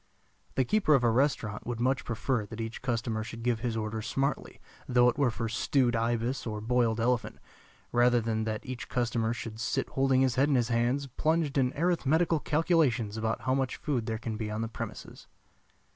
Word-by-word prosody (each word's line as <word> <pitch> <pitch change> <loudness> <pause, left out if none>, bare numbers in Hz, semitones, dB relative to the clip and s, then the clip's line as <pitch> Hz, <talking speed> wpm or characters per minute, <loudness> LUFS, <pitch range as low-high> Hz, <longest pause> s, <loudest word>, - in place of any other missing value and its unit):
The 130 - +2
keeper 200 - +3
of 130 - +2
a 120 - +4
restaurant 115 -5 0
would 120 -2 -3
much 130 +2 +1
prefer 115 -1 -1
that 110 +1 -9
each 115 0 -5
customer 115 -3 -1
should 115 0 -8
give 120 -2 +1
his 115 -1 -2
order 110 0 -3
smartly, 135 +5 -2 0.3
though 125 -1 +4
it 120 - -1
were 140 -3 +4
for 115 0 -3
stewed 120 +2 +1
ibis 120 +3 -1
or 105 -1 -3
boiled 115 0 +1
elephant, 120 0 0 0.5
rather 120 0 +4
than 110 -1 -1
that 110 -1 -3
each 130 -1 -6
customer 115 -2 0
should 115 -1 -6
sit 115 - -1
holding 135 -1 +2
his 130 -1 +1
head 145 - +3
in 140 - +3
his 120 -2 +1
hands, 120 +4 +1
plunged 155 +3 0
in 130 -2 +2
arithmetical 165 0 +2
calculations 145 - +1
about 110 0 -2
how 130 - 0
much 130 -1 0
food 130 -7 -2
there 110 -1 -1
can 110 -1 -4
be 110 -1 -3
on 110 +1 -3
the 115 - -1
premises. 115 - -8
120 Hz, 195 wpm, -29 LUFS, 115-135 Hz, 0.5 s, a